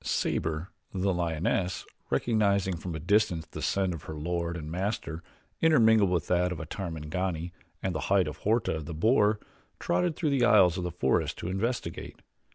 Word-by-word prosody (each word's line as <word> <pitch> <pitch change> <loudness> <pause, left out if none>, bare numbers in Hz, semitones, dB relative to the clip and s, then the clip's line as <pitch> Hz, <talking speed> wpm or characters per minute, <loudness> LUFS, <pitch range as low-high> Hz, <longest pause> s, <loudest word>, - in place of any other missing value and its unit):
Sabor, 80 +3 -1 0.2
the 95 0 0
lioness, 85 +2 -1 0.2
recognizing 100 -5 +2
from 85 0 -5
a - - -4
distance 90 -1 +2
the - - -8
scent 95 -2 +1
of 80 - -8
her 80 - -6
lord 85 +2 -2
and 75 -1 -7
master 90 -3 -3 0.4
intermingled 110 - +5
with 85 -4 0
that 90 0 +1
of 90 - -4
a 80 - -5
Tarmangani 85 0 -3 0.3
and 95 - 0
the 80 - -2
hide 95 -4 +4
of 75 0 -5
Horta, 105 -4 0
the 80 +1 -6
boar, 105 - +3 0.4
trotted 175 -3 0
through 155 -2 0
the 135 -3 +2
aisles 90 -7 +6
of 90 - -3
the 90 - -1
forest 65 -6 0
to 85 - -4
investigate. 115 +6 -3
90 Hz, 170 wpm, -29 LUFS, 80-105 Hz, 0.4 s, aisles